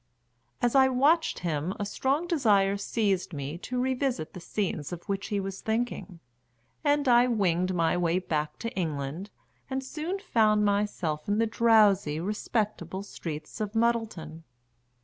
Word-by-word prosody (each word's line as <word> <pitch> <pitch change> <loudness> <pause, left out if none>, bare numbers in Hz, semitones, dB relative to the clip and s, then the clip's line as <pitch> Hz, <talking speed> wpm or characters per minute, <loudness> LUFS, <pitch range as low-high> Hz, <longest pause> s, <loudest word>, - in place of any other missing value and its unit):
As 240 - +3
I 265 -1 +6
watched 285 +6 +2
him 160 +3 -1
a 205 - -1
strong 275 +10 0
desire 210 - +3
seized 200 -3 -1
me 145 +3 -5
to 250 +6 -3
revisit 255 - -1
the - - -7
scenes 170 -4 -3
of 175 -1 -6
which 200 -1 -3
he 205 - -1
was 195 0 -5
thinking, 220 -5 -3 0.6
and 290 -1 +2
I 240 0 +6
winged 185 -5 +1
my 165 -1 +2
way 175 0 +1
back 155 -5 -2
to 230 - -1
England, 160 +1 -3 0.4
and 265 0 -2
soon 315 +7 -4
found 215 - +2
myself 200 -7 -1
in 205 +1 +1
the 230 - +3
drowsy, 210 -8 +4
respectable 200 -1 -2
streets 160 -1 -7
of 210 +1 -3
Muddleton. 225 -9 -1
205 Hz, 150 wpm, -28 LUFS, 175-240 Hz, 0.6 s, I